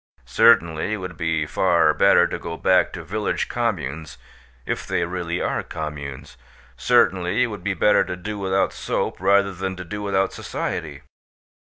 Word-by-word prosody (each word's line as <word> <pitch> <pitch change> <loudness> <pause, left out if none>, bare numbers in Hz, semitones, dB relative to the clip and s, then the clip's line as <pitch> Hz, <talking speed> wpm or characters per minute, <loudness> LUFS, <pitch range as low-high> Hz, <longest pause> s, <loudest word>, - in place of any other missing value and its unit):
Certainly, 80 +4 +3
it - - -1
would 90 -3 -7
be 80 -1 -1
far 85 -1 +2
better - - +5
to - - -4
go 85 0 -6
back 95 -1 +3
to 85 - -7
village 105 +6 -2
communes, 80 - -3 0.5
if - - -3
they 85 - 0
really 85 -1 -3
are - - -1
communes. 70 -4 -7 0.4
Certainly, 90 - +2
it 120 -3 -2
would 105 - -9
be 100 -1 -1
better 105 +1 +4
to 90 - -4
do 105 +4 -6
without 95 0 0
soap - - -3
rather 100 +1 +3
than 95 +1 -4
to 90 0 -8
do 105 +4 -6
without 95 -1 0
society. - - -5
90 Hz, 165 wpm, -22 LUFS, 80-100 Hz, 0.5 s, better